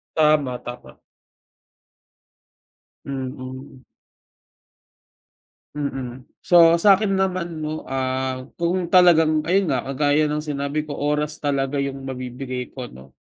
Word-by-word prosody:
Tama, 150 -5 +3
tama. 120 0 -10 2.1
Mm. 130 -1 -7 1.9
Mm. 130 -3 -4 0.2
So, 170 -1 +6
sa'kin 200 +2 +4
naman 180 -4 -1
'no, 155 0 -4
ah, 130 -1 -2
kung 175 +1 -1
talagang 160 -4 +5
ayun 190 +3 +2
nga, 130 -5 0
kagaya 145 +2 +2
ng 150 - -1
sinabi 145 +1 -3
ko, 145 - -5
oras 150 +1 -1
talaga 140 -1 0
yung 135 -1 -4
mabibigay 125 0 -5
ko 125 -2 -7
'no. 65 - -15
145 Hz, 105 wpm, -22 LUFS, 130-155 Hz, 2.1 s, So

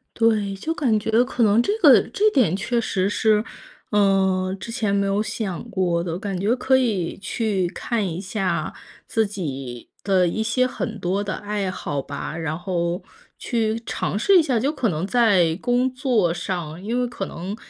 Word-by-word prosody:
对， 215 -3 +2
就 315 +12 -3
感 260 -9 +1
觉 220 +3 +2
可 250 -2 -1
能 215 +2 +5
这 410 - 0
个 - - +8
这 430 +1 +3
点 210 - +3
确 235 +4 -1
实 190 -3 0
是， 215 0 +2 0.5
呃， 190 -2 +2
之 230 - -7
前 220 -4 -1
没 200 0 +2
有 195 +1 +1
想 200 -5 -4
过 175 -5 0
的， 170 -1 -3
感 195 -3 -3
觉 215 +6 +2
可 260 +1 +2
以 210 -10 -1
去 195 -2 -1
看 225 +2 -2
一 170 -1 -3
下 195 0 -2 0.3
自 225 -1 +1
己 135 - -6
的 190 -3 +3
一 220 +6 -1
些 255 +3 +1
很 - - -5
多 190 +3 -1
的 195 -2 -3
爱 205 -2 -3
好 145 -6 -3
吧， 140 +2 -6
然 160 -1 -3
后 175 0 -2 0.4
去 225 -2 -1
尝 - - -2
试 380 - +5
一 - - +7
下。 255 -6 +1
就 270 +6 +1
可 255 -6 0
能 165 +2 -2
在 195 -8 +3
工 245 +1 +2
作 240 -10 +1
上， 175 -1 -4
因 235 +4 -1
为 245 - 0
可 200 -5 -5
能 185 +5 -6
200 Hz, 195 characters per minute, -23 LUFS, 185-230 Hz, 0.5 s, 个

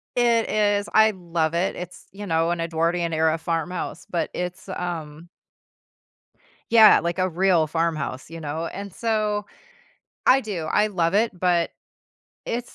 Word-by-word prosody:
It 235 -2 +2
is, 205 -1 +1
I 220 0 +6
love 170 -4 -2
it. 175 +3 0
It's, 180 0 -9
you 205 +1 -8
know, 165 -1 +1
an 170 -1 -2
Edwardian-era 165 -1 0
farmhouse, 165 +1 -4
but 170 -3 -1
it's, 180 +2 -5
um 165 -3 -5 1.4
Yeah, 220 -2 +8
like, 170 +2 -3
a 185 0 +1
real 175 -2 +2
farmhouse, 155 -4 -2
you 165 0 -8
know, 155 +3 -4
and 200 0 -7
so 215 -3 -1 0.8
I 270 +1 +6
do, 195 -7 -4
I 210 +6 +2
love 175 -3 0
it, 210 -3 +1
but 175 -2 +1 0.8
it's 240 +1 -4
175 Hz, 140 wpm, -23 LUFS, 165-205 Hz, 1.4 s, Yeah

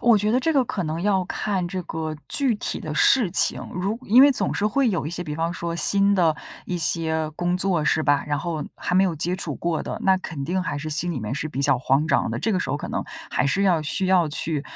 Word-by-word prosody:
我 235 -3 +5
觉 210 +2 0
得 245 - +3
这 320 +5 0
个 275 -4 +3
可 200 -5 -3
能 155 +2 -3
要 190 -1 +1
看 190 -1 -2
这 185 +1 -4
个 160 -2 -4
具 270 -5 +1
体 - - -3
的 155 -5 -5
事 200 - +4
情， - - +3
如 195 +5 -2
因 240 +5 +6
为 285 - +7
总 260 - -1
是 210 - 0
会 265 +4 +2
有 165 -6 -2
一 - - -4
些 175 0 -4
比 150 -1 -5
方 165 +2 -1
说 170 -1 -4
新 200 +4 +3
的 165 -5 +2 0.3
一 180 - -2
些 160 -1 -1
工 175 +1 -1
作， 185 -4 +1
是 160 - +2
吧？ 145 -1 +2
然 145 -1 -1
后 160 0 -3
还 180 - -3
没 190 +1 +5
有 180 - 0
接 175 +4 -1
触 155 -6 -4
过 170 -2 -2
的， - - -5
那 190 -1 +4
肯 150 -6 -6
定 180 +3 -1
还 180 - -3
是 155 +2 -5
心 160 +4 0
里 135 - -4
面 110 +5 -4
是 155 +2 -3
比 140 -1 -4
较 135 -3 +3
慌 135 +4 +1
张 - - +1
的。 - - -3
这 225 - 0
个 185 - 0
时 - - -3
候 - - -1
可 - - -7
能 - - -2 0.3
还 - - +1
是 195 +8 +1
要 180 -5 +3
需 155 +6 +1
要 180 -4 +3
去， 150 0 -1
175 Hz, 290 characters per minute, -23 LUFS, 155-195 Hz, 0.3 s, 为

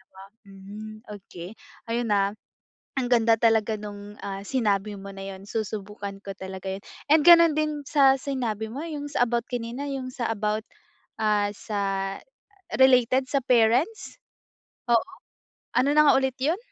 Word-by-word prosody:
2. 190 - -11 0.2
Hmm, 200 +2 -10 0.2
okey 175 -1 -10 0.4
ayun 235 0 0
na. 200 0 +2 0.7
Ang 245 - -1
ganda 230 -1 +5
talaga 225 -1 +2
nung, 205 0 -9
ah, 195 0 -5
sinabi 210 -5 0
mo 200 0 -9
na 195 - -7
yun, 195 +2 -13
susubukan 205 -2 -5
ko 195 -1 -7
talaga 190 0 -7
yun. 195 - -11 0.3
And 310 -1 +6
ganun 335 -3 +8
din 305 -1 -1
sa 275 -3 +5
sinabi 235 -6 -2
mo 280 +6 -5
yung 290 -2 -5
sa 265 -4 +2
about 235 0 -2
kanina, 245 +3 -4
yung 260 -2 -4
sa 235 - -2
about, 215 0 -1 0.6
ah, 210 -1 +2
sa 210 -1 -4 1.0
related 260 0 +5
sa 275 - +3
parents? 250 - +2 0.7
Oo? 230 -1 +5 0.8
ano 275 +2 +3
na 300 -1 +6
nga - - +4
ulit 265 -1 0
yun? 310 +7 +1
225 Hz, 150 wpm, -25 LUFS, 205-265 Hz, 1.0 s, ganun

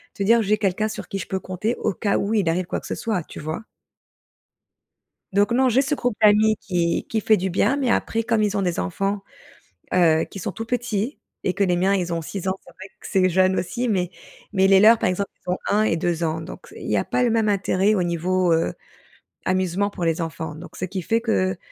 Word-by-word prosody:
te 200 - -2
dire: 230 +3 +5
«J'ai 210 +2 +2
quelqu'un 205 +1 0
sur 215 - -7
qui 195 - -3
je - - -6
peux 190 - -2
compter 190 +6 -2
au - - -1
cas 200 +3 0
où 205 +2 -1
il 190 -6 +2
arrive 180 +2 0
quoi - - -2
que - - -10
ce - - -3
soit» 215 -5 -1
tu - - -9
vois? 155 +7 -4 1.7
Donc 200 +1 +3
non 255 +2 +3
j'ai 250 +3 +4
ce 280 +2 0
groupe 245 -5 -1
d'amis 215 0 +5
qui 170 -3 -1
qui 220 - 0
fait 215 - +4
du 190 +2 -1
bien, 205 +8 +2
mais 265 -4 0
après 225 -1 0
comme 225 -1 +1
ils 210 0 +1
ont - - +2
des 175 -2 -1
enfants, 195 - -2 0.7
heu, 165 -3 +4
qui 195 - -10
sont - - -3
tout 225 - -6
petits, 240 +1 -2 0.2
et 185 - 0
que 200 - +1
les 180 -2 +2
miens 190 +3 +2
ils 180 -3 -1
ont 165 - -2
6 190 +3 -5
ans 190 - +2
c'est - - -14
vrai 190 - -11
que - - -10
c'est 185 -2 +3
jeune 185 +1 +3
aussi 240 +7 -2
mais 185 -5 0 0.4
mais 190 -1 +3
les 195 -1 +6
leurs 220 +3 +7
par - - 0
exemple 195 +2 -2 0.2
ils 180 - -6
ont 180 - 0
1 210 +1 +3
et 165 -6 +1
2 170 0 -1
ans, 160 0 -1
donc - - -9
c - - -15
il - - -6
y - - +2
a - - +1
pas - - 0
le 245 - +3
même 225 -1 +2
intérêt 200 0 +2
au 190 - +1
niveau, 175 +1 +1
heu, 165 - +1 0.7
amusement 185 +1 0
pour 180 -4 -4
les 165 +1 0
enfants, 160 -1 -5
donc 170 +3 -11
ce 185 - -2
qui 185 +1 -4
fait 225 +7 +1
qu'on 185 -5 0
195 Hz, 250 wpm, -23 LUFS, 180-215 Hz, 1.7 s, leurs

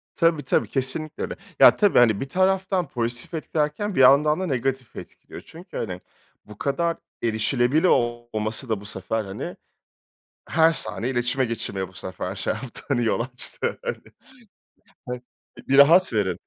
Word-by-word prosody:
Tabii, 165 -3 +2
tabi, - - +1
Kesinlikle 140 +3 -3
öyle. - - -4 0.2
Ya - - +8
tabii 205 - +4
hani 110 -3 +4
bir 135 - -4
taraftan 185 -1 +1
pozitif 120 +2 -3
etkilerken, 160 +5 -2
bir - - 0
yandan 145 +5 +6
da 190 - -1
negatif 130 -2 -2
etkiliyor. - - -11
Çünkü 170 +3 -11
hani 95 -4 -4 0.4
bu 105 -1 -13
kadar 165 +4 -1 0.3
erişilebilir 120 +6 +1
olması 120 -5 0
da 110 -3 -1
bu - - -12
sefer, 110 +2 -3
hani, 95 0 -6 0.9
her 160 0 +4
saniye 105 - 0
iletişime 125 +2 +1
geçilmeye 100 -5 -3
bu 95 - -19
sefer 95 +2 -5
şey 95 - -1
yaptı 115 +2 -7
hani 120 -1 +1
yol 110 - +1
açtı 125 +1 -3
hani. 485 - -7 1.4
Bir 135 +1 +3
rahat 165 +1 +6
verin! 95 -5 0
130 Hz, 150 wpm, -24 LUFS, 110-155 Hz, 1.4 s, Ya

